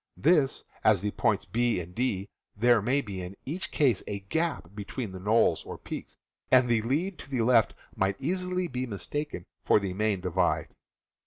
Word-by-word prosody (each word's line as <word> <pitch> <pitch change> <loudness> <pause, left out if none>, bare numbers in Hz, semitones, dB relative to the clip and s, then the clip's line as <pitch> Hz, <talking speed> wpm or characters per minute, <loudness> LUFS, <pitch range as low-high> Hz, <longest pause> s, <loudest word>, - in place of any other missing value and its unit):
Thus, 150 -3 +3 0.2
at 110 -2 +6
the 105 +1 -1
points - - +1
B 120 +2 +1
and 90 +1 -8
D 105 -5 -1 0.3
there 120 0 +5
may 130 +7 +2
be 100 -7 -6
in 90 +2 -7
each 165 +8 -4
case 130 -9 +2
a 100 -1 -4
gap 160 - -2
between 105 +2 -5
knolls 110 +3 +3
or - - -7
peaks, - - -8 0.3
and 130 -1 +6
the 115 -2 +3
lead 155 - -1
to - - -10
the 130 -4 0
left 115 -2 +4 0.2
might 95 0 +1
easily 180 +3 -1
be 130 -3 -3
mistaken 120 - -4 0.2
for - - +5
the 100 -2 -3
main 105 0 0
divide. 90 0 0
115 Hz, 175 wpm, -28 LUFS, 100-140 Hz, 0.3 s, at